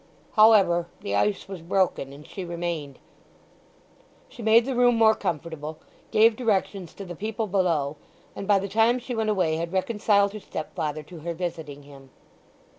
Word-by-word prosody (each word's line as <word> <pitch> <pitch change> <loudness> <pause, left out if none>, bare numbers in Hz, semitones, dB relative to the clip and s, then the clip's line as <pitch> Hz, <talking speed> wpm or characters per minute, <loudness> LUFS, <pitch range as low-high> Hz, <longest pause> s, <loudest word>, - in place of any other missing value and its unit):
However, 200 -6 +5
the 100 - -4
ice 195 - 0
was 190 -3 -7
broken, 170 -5 0
and 145 +2 -12
she 190 - -7
remained. 170 -5 -4 1.3
She - - -11
made 225 +1 +5
the 270 - -2
room 245 0 +4
more 220 -1 +5
comfortable, 160 -4 -4 0.3
gave 220 +1 +5
directions 200 -6 -1
to 200 - -8
the 175 - -7
people 220 +4 -3
below, 170 -7 0 0.4
and 195 - -6
by 205 -1 +5
the 195 +1 -2
time 225 +5 +3
she 250 0 -6
went 220 -2 -1
away 180 -6 +1
had 170 +1 -3
reconciled 200 +1 +2
her 215 - -6
stepfather 155 -4 -5
to 170 +2 -12
her 170 +2 -5
visiting 160 -5 -5
him. 140 -1 -15
185 Hz, 165 wpm, -25 LUFS, 160-215 Hz, 1.3 s, However